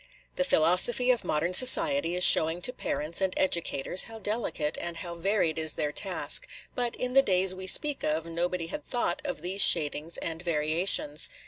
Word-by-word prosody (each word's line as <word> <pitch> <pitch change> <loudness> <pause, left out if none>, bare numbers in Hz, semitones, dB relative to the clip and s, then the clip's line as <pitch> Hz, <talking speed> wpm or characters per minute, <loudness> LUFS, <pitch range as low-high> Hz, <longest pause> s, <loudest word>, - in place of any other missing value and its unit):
The - - -1
philosophy 235 - +1
of 245 - -1
modern 165 +4 -3
society 280 - +4
is 180 - -1
showing 160 +2 +4
to 250 - +3
parents 165 -7 -4
and 190 -1 -2
educators 170 -2 0
how 225 -1 -10
delicate 205 -8 -4
and 170 -1 -6
how 170 0 -8
varied 170 -2 -2
is 160 -1 0
their 150 -1 -4
task; 190 +4 -1 0.3
but 245 -1 -3
in 250 0 -5
the 270 - +5
days 190 -5 0
we 185 0 -10
speak 295 +8 +4
of 155 +1 -3
nobody 170 +1 -4
had 295 - -8
thought 240 -8 -3
of - - -7
these 190 +3 -1
shadings 155 -1 +4
and 165 0 -6
variations. 155 -1 +1
180 Hz, 180 wpm, -26 LUFS, 160-220 Hz, 0.3 s, the